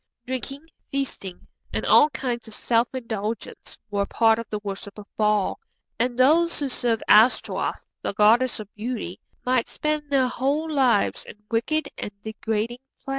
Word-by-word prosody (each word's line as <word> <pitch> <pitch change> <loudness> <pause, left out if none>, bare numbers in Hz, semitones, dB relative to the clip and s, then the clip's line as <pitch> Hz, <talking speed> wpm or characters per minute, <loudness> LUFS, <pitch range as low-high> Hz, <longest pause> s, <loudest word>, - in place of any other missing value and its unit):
Drinking, 270 +3 -4 0.2
feasting, 255 -9 -4 0.3
and - - -2
all 300 - +6
kinds 245 -4 -3
of 220 - -8
self 235 0 +2
indulgence 225 -4 -5
were 200 -1 0
part 225 -1 +3
of 230 - -7
the 210 - -3
worship 200 0 -6
of 210 - -9
Baal, 210 -2 +1 0.4
and 245 +1 0
those 320 +6 +4
who 285 -2 -1
served 235 -3 0
Ashtaroth, 220 +4 +4 0.2
the - - -3
goddess 230 +5 +4
of 210 -1 -9
beauty, 215 -4 -4 0.3
might 250 -2 +2
spend 300 -1 -2
their 270 -2 +3
whole 275 +5 0
lives 265 -9 +2
in - - -10 0.2
wicked 280 +7 0
and - - -3
degrading 220 +2 -2 0.3
pleasures. - - -7
240 Hz, 155 wpm, -24 LUFS, 215-270 Hz, 0.4 s, all